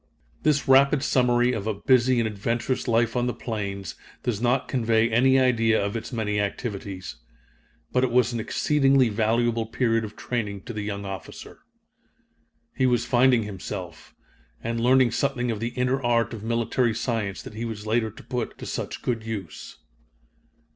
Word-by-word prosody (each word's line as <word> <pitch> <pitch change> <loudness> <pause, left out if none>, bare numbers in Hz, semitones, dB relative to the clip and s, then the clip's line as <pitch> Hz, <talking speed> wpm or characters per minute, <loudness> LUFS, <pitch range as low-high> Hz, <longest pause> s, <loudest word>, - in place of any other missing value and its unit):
This 150 -2 +1
rapid 135 +1 +5
summary 125 -1 +3
of 110 -2 -3
a 110 - -1
busy 125 +3 +3
and 115 - +1
adventurous 115 +5 -2
life 115 0 +2
on 125 0 +1
the 125 - -2
plains 100 -7 -4 0.3
does 115 -4 -2
not 125 +2 +1
convey 115 -3 +2
any 130 +4 +4
idea 115 -3 +3
of 100 +1 -2
its 115 +3 -5
many 105 -3 -1
activities. 100 - -4 0.7
But 125 - +2
it 130 - +2
was 125 0 +2
an 115 - -2
exceedingly 135 +1 +2
valuable 115 +1 +1
period 115 -1 +1
of 105 -1 -7
training 105 -5 -3
to 120 - -7
the 105 - -4
young 100 -1 -4
officer. 95 -2 -8 1.2
He 130 - +2
was 120 -1 +1
finding 125 -2 +4
himself, 95 -4 -7 0.5
and 115 0 -2
learning 125 0 +4
something 125 -1 0
of 110 - -3
the 115 +2 -2
inner 125 +2 +1
art 120 -1 +1
of 110 - -6
military 115 0 0
science 115 -5 -2
that - - -10
he 110 +2 -5
was 110 -2 -6
later 110 +1 +1
to 110 - -14
put 125 -3 -4
to - - -8
such - - -5
good 115 -3 -1
use. 100 -8 -7
115 Hz, 170 wpm, -25 LUFS, 110-125 Hz, 1.2 s, rapid